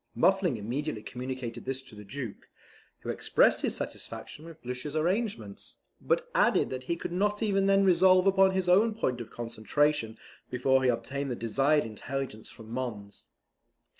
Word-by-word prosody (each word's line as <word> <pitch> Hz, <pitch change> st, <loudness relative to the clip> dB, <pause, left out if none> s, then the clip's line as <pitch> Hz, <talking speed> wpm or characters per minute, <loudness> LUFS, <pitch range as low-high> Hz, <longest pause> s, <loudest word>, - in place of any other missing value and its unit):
Muffling 190 Hz, -8 st, +3 dB
immediately 120 Hz, +2 st, -3 dB
communicated 125 Hz, -1 st, -6 dB
this 135 Hz, 0 st, -1 dB
to 130 Hz, -, -15 dB
the 105 Hz, 0 st, -10 dB
Duke, 110 Hz, +1 st, -7 dB, 0.5 s
who -, -, -7 dB
expressed -, -, +3 dB
his -, -, 0 dB
satisfaction 155 Hz, -, -5 dB
with 165 Hz, -1 st, -11 dB
Blucher's 125 Hz, +4 st, -5 dB
arrangements, 170 Hz, -, -2 dB, 0.2 s
but -, -, 0 dB
added -, -, +3 dB
that 130 Hz, 0 st, -5 dB
he 170 Hz, -, -1 dB
could 170 Hz, -, -6 dB
not 205 Hz, +4 st, 0 dB
even 195 Hz, -2 st, +2 dB
then 195 Hz, 0 st, +4 dB
resolve 185 Hz, 0 st, +5 dB
upon 195 Hz, 0 st, +5 dB
his 190 Hz, -1 st, -1 dB
own 210 Hz, +5 st, +4 dB
point 125 Hz, -, -1 dB
of 115 Hz, -, -8 dB
concentration 120 Hz, +2 st, -1 dB, 0.3 s
before 130 Hz, +1 st, +2 dB
he 130 Hz, -, +4 dB
obtained 140 Hz, +3 st, -2 dB
the 125 Hz, -, -2 dB
desired 135 Hz, +6 st, +2 dB
intelligence 115 Hz, +1 st, -5 dB
from 110 Hz, -1 st, -12 dB
Mons. 110 Hz, -5 st, -5 dB
135 Hz, 160 wpm, -29 LUFS, 120-185 Hz, 0.5 s, resolve